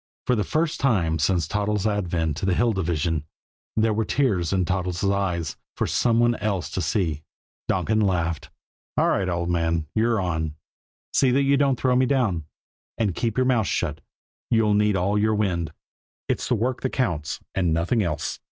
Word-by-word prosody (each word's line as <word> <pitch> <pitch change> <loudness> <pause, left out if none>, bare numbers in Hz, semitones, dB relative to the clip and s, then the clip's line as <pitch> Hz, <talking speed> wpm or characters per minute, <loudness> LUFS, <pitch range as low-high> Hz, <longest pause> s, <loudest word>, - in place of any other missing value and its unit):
For 125 - +2
the 105 - +1
first 155 +5 -1
time 85 -12 +1
since 85 0 +1
Toddles' 105 +1 -1
advent 85 -7 0
to 95 - -2
the 95 - +2
Hill 120 +2 +2
Division, 80 -4 -1 0.5
there 110 0 +2
were 110 +1 +1
tears 105 - +1
in 95 -2 +1
Toddles' 90 +1 -2
eyes 95 -4 0 0.2
for - - +1
some 115 -1 +2
one 120 0 +4
else 100 -3 -2
to 95 - -2
see. 80 -3 0 0.5
Donkin 110 0 +1
laughed. 85 -5 0 0.5
"All - - +3
right, 95 -2 +1
old 85 0 -1
man, 85 -1 0
you're 115 0 +2
on. 80 -4 -2 0.6
See 135 - +4
that 135 +3 +3
you 140 +1 +4
don't 135 -2 +2
throw 130 -1 +2
me 130 0 +3
down. 110 - +1 0.5
And 105 -5 +1
keep 115 +5 -2
your 130 - +3
mouth 120 -5 +2
shut; 75 -3 -2 0.5
you'll 110 -2 +3
need 105 0 +3
all 100 +3 +1
your 110 +1 +2
wind. 85 -6 0 0.6
It's - - -2
work 120 +2 0
that 130 - 0
counts, 85 - -1
and 90 -4 +1
nothing 85 +8 +1
else. 85 -6 -2
100 Hz, 180 wpm, -24 LUFS, 85-115 Hz, 0.6 s, one